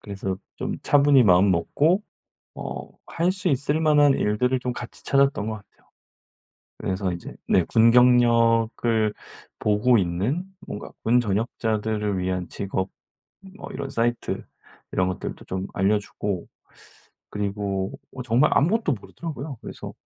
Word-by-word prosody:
그래서 95 -2 -4 0.2
좀 - - -3
차분히 140 -2 +5
마음 95 -1 +5
먹고 150 - +2 0.5
어 - - -6 0.2
할 175 +2 0
수 185 -1 -1
있을 140 +2 0
만한 150 -3 +5
일들을 125 +5 +1
좀 125 -1 -2
같이 120 0 -9
찾았던 140 -6 +2
것 110 - -2
같아요. 105 -2 -16 0.9
그래서 95 -1 -2
인제 85 - -8
네. 95 - +4
군 115 +1 +5
경력을 115 -2 +4 0.4
보고 105 +3 +3
있는 100 - -1 0.2
뭔가 105 - -7
군 120 +2 +4
전역자들을 110 -1 -1
위한 90 -1 -2
직업 95 -1 -3 0.7
뭐 - - -9
이런 140 -1 -5
사이트 120 +1 -1 0.5
이런 90 0 +1
것들도 95 - -5
좀 95 +1 -3
알려 100 +3 +2
주고 100 -2 -4 0.8
그리고 100 -2 -3 0.2
어 130 - -5
정말 125 +5 +3
아무것도 185 +3 +2
모르더라고요. 140 - -7
그래서 - - -8
115 Hz, 275 characters per minute, -24 LUFS, 100-135 Hz, 0.9 s, 차분히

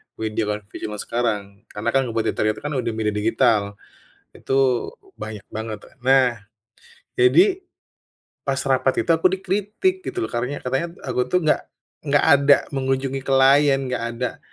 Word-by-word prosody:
media 110 0 -2
konvensional 105 0 -5
zaman - - -9
sekarang. 115 -3 -1 0.3
Karena 105 +3 -3
kan 135 - +3
kompetitornya 110 -1 0
itu - - -13
kan 145 +1 -3
udah 120 -2 -2
media 110 -1 0
digital. 105 -1 +1 0.6
Itu - - -5 0.6
banyak 110 -2 -8
banget. 110 0 -4 0.3
Nah, 130 -2 +4 0.8
jadi, 380 0 +4 0.8
pas 135 -1 -1
rapat 130 -1 +1
itu - - -15
aku 165 +3 +3
dikritik 205 - -1
gitu, - - -6
loh. - - -9
Karanya 125 +4 -2
katanya, 135 +6 -1 0.2
aku 125 -1 0
tuh 180 - +4
nggak 155 - +3 0.5
nggak 145 0 +3
ada 140 0 +6 0.2
mengunjungi 135 0 -1
klien, 135 +1 +5
nggak 125 -2 -3
ada, 125 +1 -4
130 Hz, 145 wpm, -22 LUFS, 110-140 Hz, 0.8 s, ada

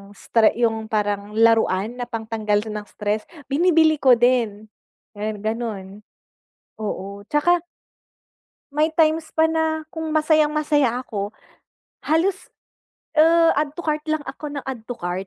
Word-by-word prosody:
stre 225 +1 +2
'yong 225 -2 0
parang 205 -1 -2
laruan 225 -1 +2
na 245 - -1
pangtanggal 220 -3 -1
ng 210 -1 -5
stress 210 0 -2 0.3
binibili 320 +1 +4
ko 260 -3 +6
din. 230 -3 +1 0.5
'Yon, 210 -1 -3
gano'n 220 -3 -3 0.9
oo, 200 -1 -5
'tsaka, 345 +4 +3 1.1
may 300 +2 +2
times 315 -1 +2
pa 320 - +4
na 320 -1 0
kung 320 -1 -4
masayang-masaya 300 -5 +2
ako, 205 -1 -5 0.7
halos 360 +5 +1 0.7
ah, 330 +1 +6
add 295 -1 -3
to 345 - -5
cart 305 -1 0
lang 310 -1 0
ako 270 +3 -7
ng 280 - -4
add 265 -3 -5
to 245 - -4
cart, 180 +1 -4
245 Hz, 130 wpm, -22 LUFS, 215-310 Hz, 1.1 s, ko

